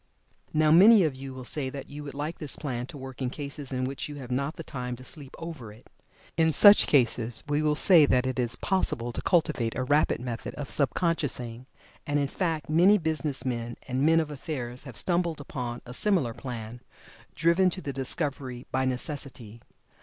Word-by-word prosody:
Now, 155 0 +3
many 200 +5 +8
of 150 -5 0
you 135 0 -8
will 130 0 -8
say 135 0 -2
that 135 0 -8
you 145 +1 -8
would 140 -1 -8
like 150 +3 -4
this 150 -4 +1
plan 125 -4 -4
to 145 - -9
work 130 0 -9
in 130 - 0
cases 140 0 -5
in 130 -1 -2
which 135 +3 -4
you 145 - -7
have 130 -3 -8
not 140 +4 -1
the 165 - -7
time 125 -4 -5
to 125 - -12
sleep 140 0 -2
over 160 -10 -8
it. 110 +4 -18 0.5
In 160 -1 +4
such 205 +7 +7
cases 120 -4 +1
we 145 +1 +1
will 150 -1 +2
say 160 -2 +6
that 125 -1 +2
it 130 0 -2
is 120 -1 +1
possible 120 -11 -1
to - - -4
cultivate 130 -10 +1
a 130 - 0
rapid 145 +4 +2
method 120 -2 -6
of 145 -1 -6
sub 140 -3 +1
consciousing, 130 -8 0 0.4
and 145 0 +1
in 140 -1 0
fact 165 -3 -2
many 180 +7 +5
business 155 -6 -1
men 120 -2 -3
and 130 0 -1
men 165 +3 +4
of 155 -2 -2
affairs 130 -4 -6
have 125 -6 -9
stumbled 170 - 0
upon 125 -4 -6
a 125 - -9
similar 165 - +1
plan, 120 -2 -7 0.5
driven 170 +3 +3
to 185 - -5
the 140 -6 -5
discovery 135 -2 -3
by 130 0 0
necessity. 130 -4 -5
140 Hz, 200 wpm, -27 LUFS, 125-155 Hz, 0.5 s, many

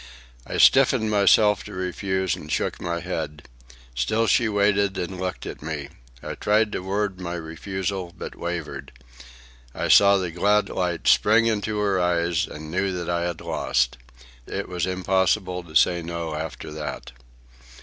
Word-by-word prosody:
I - - -4
stiffened 130 -5 +5
myself 105 0 +4
to - - -9
refuse, 95 0 -1
and 75 - -9
shook - - -1
my 85 -1 -2
head. 80 -4 -5 0.5
Still 65 - +1
she 115 +2 +3
waited 100 -1 +2
and 90 +1 -4
looked 90 0 -4
at - - -7
me. 75 -2 -5 0.3
I - - -4
tried 105 +1 +1
to - - -2
word 95 0 -2
my 85 -1 -4
refusal, 90 +3 -4
but - - -7
wavered. 75 -6 -5 0.8
I - - -2
saw 100 0 +7
the 90 -3 -2
glad 105 +5 +2
light 90 -2 -2
spring 110 +2 +5
into 110 -1 0
her 100 -2 +1
eyes 85 -1 +1
and 75 +1 -9
knew 95 +2 0
that 90 -1 -3
I 85 0 0
had 85 -2 -5
lost. - - 0 0.5
It - - -4
was 90 -1 -2
impossible 95 0 0
to 80 -3 -14
say 85 +2 +4
no 85 -1 -4
after 80 0 -6
that. 75 -1 -6
90 Hz, 160 wpm, -24 LUFS, 85-100 Hz, 0.8 s, saw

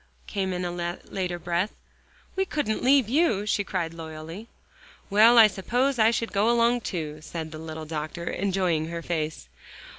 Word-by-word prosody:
came 190 -2 -2
in 180 0 -2
a 175 - -2
later 175 +1 -4
breath, 175 +4 -1 0.6
"we 385 - +2
couldn't 295 - -2
leave 265 -2 +5
you," 240 - +2
she 205 -1 +1
cried 175 -5 -3
loyally. 165 +5 -8 0.6
"Well, 225 +4 +7
I 225 - +10
suppose 245 +6 0
I 220 0 +6
should 230 0 -1
go 205 +3 +3
along 235 +1 +3
too," 155 -7 -4
said 160 0 -6
the 155 - -8
little 160 0 -7
doctor, 155 +2 -5
enjoying 180 -5 0
her 170 0 -5
face. 155 - -3
185 Hz, 160 wpm, -26 LUFS, 165-225 Hz, 0.6 s, I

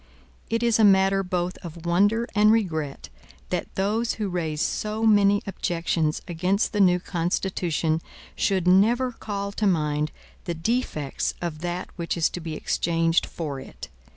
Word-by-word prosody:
It 230 +1 0
is 235 -1 +3
a - - +5
matter 195 -1 +5
both 180 -1 -2
of 170 -1 -10
wonder 205 +7 +2
and 210 +1 +5
regret, 160 -10 -1 0.4
that - - -3
those 215 +4 0
who 210 -3 -3
raise 160 -4 -2
so 215 +7 -1
many 205 -2 +4
objections 165 -5 -1
against 185 +6 0
the 210 - 0
new 180 -2 +5
Constitution 170 -2 -1 0.3
should 190 -3 +1
never 230 +8 +4
call 200 -3 -4
to 210 +1 0
mind 150 -4 +1 0.3
the 170 - -2
defects 165 - -1
of 170 -3 -4
that 175 +2 -4
which 170 0 -2
is 165 - +2
to - - -5
be 160 -2 -5
exchanged 165 +1 +1
for 145 -5 -5
it. 130 - -10
180 Hz, 155 wpm, -25 LUFS, 165-205 Hz, 0.4 s, a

